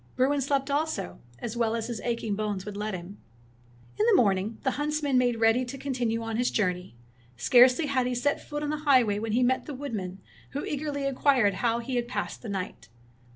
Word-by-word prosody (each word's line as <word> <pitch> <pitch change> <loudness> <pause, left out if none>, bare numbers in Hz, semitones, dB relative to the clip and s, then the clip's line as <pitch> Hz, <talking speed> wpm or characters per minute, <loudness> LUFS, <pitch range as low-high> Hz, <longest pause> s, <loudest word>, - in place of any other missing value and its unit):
Bruin 275 +2 +2
slept 275 +1 0
also, 290 - -2 0.2
as 230 - -5
well 230 -1 +1
as 225 -1 -2
his 235 -2 -5
aching 230 -3 -2
bones 205 -2 -3
would 210 -1 -6
let 210 -1 -3
him. 180 +3 -9 0.8
In 425 - +4
the 460 - +6
morning 205 - +2
the 265 - +2
huntsman 295 0 -1
made 245 -1 +3
ready 225 +3 +4
to 260 +3 -7
continue 245 -4 -2
on 225 -1 -3
his 245 +1 +2
journey. 180 - -1 0.4
Scarcely 250 - +5
had 260 -3 +1
he 250 - -1
set 265 +4 0
foot 295 0 -5
on 295 - -1
the 305 - -1
highway 255 -9 +3
when 220 0 -3
he 250 +2 +3
met 260 +1 +1
the 295 - -5
woodman, 205 -9 -5 0.3
who 285 - -3
eagerly 285 -1 -3
inquired 260 -6 +3
how 235 -1 +2
he 245 +2 -3
had 240 0 -1
passed 245 - -4
the 230 - -7
night. 190 -2 -5
245 Hz, 205 wpm, -27 LUFS, 215-275 Hz, 0.8 s, the